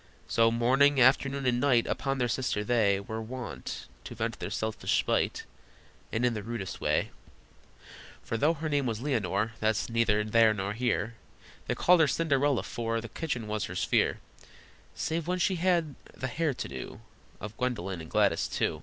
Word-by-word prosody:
So 115 0 +4
morning, 130 +5 +3
afternoon, 135 +2 +3
and 120 -1 +2
night 125 -4 +3
Upon 135 0 -1
their 125 -1 +1
sister 120 -3 -1
they 105 -4 +2
Were 110 +3 -5
wont 125 +2 -6 0.2
to - - -7
vent - - -3
their - - -4
selfish 110 0 -1
spite, - - 0 0.7
And 115 +2 +1
in 120 - +2
the 105 - -4
rudest 110 -3 -5
way: - - +1 1.1
For - - -3
though 150 +8 +2
her 160 +1 -4
name 145 -3 +1
was 110 -2 -2
Leonore, 115 - 0
That's 110 +1 0
neither 115 -2 +2
there 110 0 +4
nor 100 0 -2
here, 120 -1 -1 0.5
They - - 0
called 180 0 +5
her 160 - +5
Cinderella, 140 -3 +1
for 115 -1 -2
The 115 0 -8
kitchen 125 -5 -3
was 105 -1 -2
her 95 - -7
sphere, - - +1 0.8
Save 165 0 -2
when 180 +1 0
the 180 - +1
hair 175 +1 -3
she 160 -2 -2
had 135 -4 -1
to - - -4
do 65 -1 -8 0.4
Of 105 +1 -7
Gwendolyn 95 -8 -2
(and 80 - -10
Gladys, 100 -6 +2
too). - - -1
120 Hz, 175 wpm, -29 LUFS, 110-140 Hz, 1.1 s, called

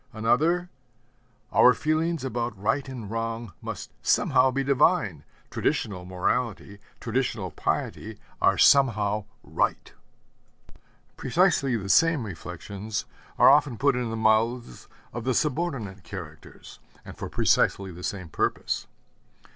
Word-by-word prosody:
Another, 165 +11 +1 0.8
'Our 125 - +6
feelings 160 +1 0
about 120 -5 -3
right 120 +7 -1
and 115 -6 -7
wrong 115 -2 -4
must - - -7
somehow 130 +1 +3
be 135 +1 -1
divine; 135 - +2 0.3
traditional 95 -5 -2
morality, 100 +2 -2 0.2
traditional 115 -6 -2
piety, 110 +6 -3 0.2
are - - +4
somehow 105 -7 +4 0.2
right.' - - -2 1.2
Precisely 140 -4 +2
the 100 -2 -6
same 160 - +3
reflections 100 +3 -6 0.3
are - - +7
often 140 -4 +3
put 140 +1 +2
in 125 -2 -2
the 115 - -4
mouths 110 - 0 0.3
of 120 - -5
the 130 0 0
subordinate 130 - -2
characters, 80 -6 -10 0.3
and - - -10
for - - -6
precisely 95 -1 +1
the 90 +1 -11
same 95 -1 -4
purpose. - - -2
115 Hz, 115 wpm, -26 LUFS, 100-135 Hz, 1.2 s, are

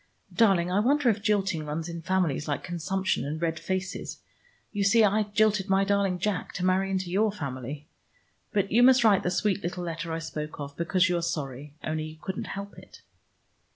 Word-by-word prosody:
Darling, 190 -6 +3
I 190 - +2
wonder 270 +4 +3
if 210 -1 -4
jilting 200 -5 +1
runs 155 +2 -4
in 170 -1 -6
families 170 -5 0
like 145 - -2
consumption 185 +2 -1
and 150 +3 -4
red 165 -1 -1
faces. 185 +3 -4 0.5
You 205 -2 -1
see 220 +3 +5
I 210 +1 +3
jilted 210 -1 +1
my 195 0 +4
darling 200 -2 +1
Jack, 190 +1 -2
to 180 - -2
marry 190 +1 +2
into 190 -2 -2
your 210 +3 +2
family. 140 - -6 0.6
But 200 -2 0
you 230 - +5
must 255 0 +6
write 205 -4 +5
the - - -1
sweet 200 +2 0
little 180 0 -4
letter 165 -1 -4
I 160 - -1
spoke 150 -2 -6
of, 140 0 -6
because 180 +2 +2
you 175 -1 +1
are - - -1
sorry, 145 -4 -4
only 155 0 -2
you 155 0 -9
couldn't 190 +3 -4
help 200 0 -7
it." - - -16
185 Hz, 195 wpm, -27 LUFS, 160-200 Hz, 0.6 s, must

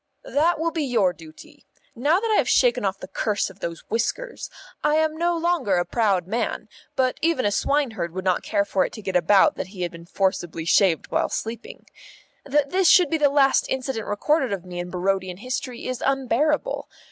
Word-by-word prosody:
"That 340 -5 +2
will 330 +1 0
be 325 - -2
your 230 -9 +2
duty. 160 -2 -15 0.3
Now 290 +9 +2
that 450 +1 -2
I 430 - +4
have - - +2
shaken - - +3
off 195 -1 -1
the 185 - -9
curse 200 +1 -1
of 190 - -19
those 170 -3 -6
whiskers, 460 - -2 0.3
I 300 - +3
am 315 0 +1
no 340 +1 0
longer 330 - +1
a 175 0 +1
proud 200 -7 +1
man, 225 +6 -3 0.3
but 260 -2 0
even 325 -6 +1
a 205 - +2
swineherd 235 - 0
would 185 +2 -6
not 185 -1 +2
care 200 -2 0
for 190 -2 +1
it - - -4
to 215 - -9
get 190 -1 -4
about 185 +3 +4
that - - -4
he 185 -2 -6
had 175 - -2
been 170 0 -12
forcibly 175 -4 -1
shaved 170 -1 +2
while - - +1
sleeping. 235 - -6 0.6
That 285 0 +1
this 375 -2 +3
should 355 -6 +6
be 320 - +1
the 290 -1 +4
last 275 -1 +3
incident 260 -4 -3
recorded 265 +5 +1
of 190 -3 -4
me 180 -1 -7
in 175 0 -5
Barodian 185 0 -1
history 250 +2 -5
is 255 -1 -4
unbearable. 275 - 0
230 Hz, 205 wpm, -23 LUFS, 185-300 Hz, 0.6 s, should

